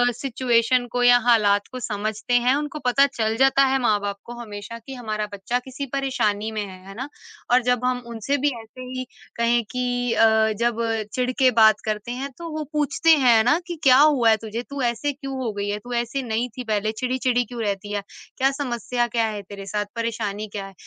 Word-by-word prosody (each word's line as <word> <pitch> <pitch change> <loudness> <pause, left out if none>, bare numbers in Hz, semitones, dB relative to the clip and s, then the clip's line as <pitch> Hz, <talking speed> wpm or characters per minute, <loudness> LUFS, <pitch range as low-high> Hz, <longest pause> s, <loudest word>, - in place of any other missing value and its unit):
Situation 245 -1 +1
को 245 0 0
या 245 0 +7
हालात 205 -4 +4
को 255 - -6
समझते 215 +1 -3
हैं। 245 +2 +4
उनको 295 +1 -3
पता 265 +3 +5
चल 220 -1 0
जाता 270 +1 +5
है 270 0 +2
माँ-बाप 205 -3 0
को 240 - -8
हमेशा 215 0 -7
कि 250 +4 -10
हमारा 215 -3 -3
बच्चा 200 +5 -2
किसी 260 +2 -7
परेशानी 220 -6 0
में 215 -1 -3
है, 185 -1 -12
है 195 - -9
ना? 260 +6 -5 0.4
और 250 +1 +5
जब 250 0 +1
हम 250 -1 0
उनसे 235 +5 -2
भी 290 +2 +2
ऐसे 225 +3 -13
ही 255 0 -5 0.3
कहें 235 0 +2
कि 245 -1 -1
अ, 220 -1 +4
जब 235 -1 +1 0.3
चिढ़ 250 0 0
के 260 -1 +5
बात 220 -2 +5
करते 215 +2 -3
हैं, 265 +3 -4
तो 335 -1 -7
वो 310 - -2
पूछते 300 +2 +1 0.2
हैं 230 -3 +6
ना 295 +8 +3
कि 350 - -4
क्या 260 -3 +7
हुआ 285 -6 +5
है 220 - +5
तुझे, 225 +2 -5
तू 280 +2 -6
ऐसे 240 +4 0
क्यों 275 -1 -7
हो 230 - -1
गई 200 0 -3
है, 205 +1 -2
तू 245 +4 -8
ऐसे 240 +3 -1
नहीं 235 +1 -1
थी 250 - -4
पहले, 215 -2 0
चिढ़ी-चिढ़ी 250 +1 0
क्यों 240 -1 -7
रहती 205 0 -3
है, 205 - -1 0.4
क्या 270 +1 +3
समस्या 245 -3 -2
क्या 230 -1 +1
है 210 -2 -4
तेरे 200 0 -10
साथ, 205 +1 -2
परेशानी 220 -2 -3
क्या 200 -1 -6
है? 195 - -11
240 Hz, 215 wpm, -23 LUFS, 215-255 Hz, 0.4 s, या